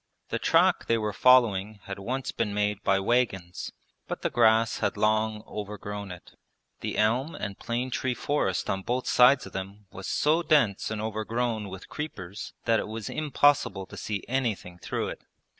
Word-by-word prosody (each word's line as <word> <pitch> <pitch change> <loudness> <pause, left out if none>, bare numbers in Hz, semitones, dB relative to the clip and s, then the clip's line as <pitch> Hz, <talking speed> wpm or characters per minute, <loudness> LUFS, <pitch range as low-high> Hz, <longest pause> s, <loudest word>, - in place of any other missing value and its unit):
The - - -1
track - - +3
they 115 - +3
were 105 -2 -2
following 110 -2 +4
had 100 0 -6
once 130 +6 -3
been 105 -3 -2
made 105 0 0
by 95 - +2
wagons, 95 -5 0 0.4
but - - -5
the - - 0
grass 110 0 +4
had - - -1
long 110 0 +1
overgrown 105 -1 -6
it. 90 -1 -10 0.5
The - - -4
elm 120 +9 +1
and 100 -1 -5
plane 125 +2 -2
tree 125 0 -1
forest 120 -12 0
on 95 - -1
both 125 +5 -2
sides 130 +2 +5
of - - -11
them 100 +2 -6
was 95 -1 -7
so 155 +3 +2
dense 145 - +2
and 110 -1 -3
overgrown 110 0 -2
with 95 +1 -9
creepers 105 - -6
that 115 -2 +3
it - - -3
was 110 0 -5
impossible 145 -9 +2
to - - -12
see 105 -2 -4
anything 115 -9 -2
through - - -3
it. - - -7
110 Hz, 175 wpm, -27 LUFS, 100-125 Hz, 0.5 s, sides